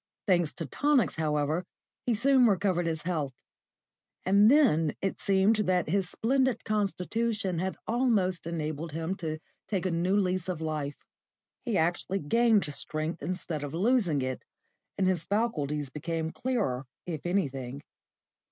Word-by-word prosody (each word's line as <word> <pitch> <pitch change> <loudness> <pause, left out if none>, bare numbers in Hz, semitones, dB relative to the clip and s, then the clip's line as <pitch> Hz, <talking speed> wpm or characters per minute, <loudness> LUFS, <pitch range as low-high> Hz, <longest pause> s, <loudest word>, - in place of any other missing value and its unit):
Thanks 175 -6 +3
to 165 - -5
tonics, 285 - +2
however, 155 +1 0 0.4
he 240 - +3
soon 255 +2 +5
recovered 185 -4 +1
his 160 -2 -2
health; 155 -7 -2 0.9
and 200 +3 +6
then 195 - +4
it 195 - -3
seemed 195 +2 +3
that 185 -5 +1
his 190 +1 +1
splendid 260 +1 +1
constitution 210 -1 -1
had 190 +1 -2
almost 215 -8 +1
enabled 155 -1 -3
him 165 +3 -2
to 155 -2 -3 0.3
take 190 -3 -1
a 185 - +1
new 175 +4 +1
lease 185 -2 0
of 175 -4 -2
life. 155 -3 -3 0.7
He 235 -5 0
actually 175 +3 0
gained 225 +5 +3
strength 155 +3 -4
instead 175 -4 -3
of 145 +2 -5
losing 185 - +2
it, 130 0 -3 0.5
and 190 - +2
his 185 -3 +1
faculties 150 - -1
became 160 +2 -3
clearer 195 - -1 0.2
if 160 -4 -5
anything. 140 -7 -2
180 Hz, 140 wpm, -29 LUFS, 155-210 Hz, 0.9 s, and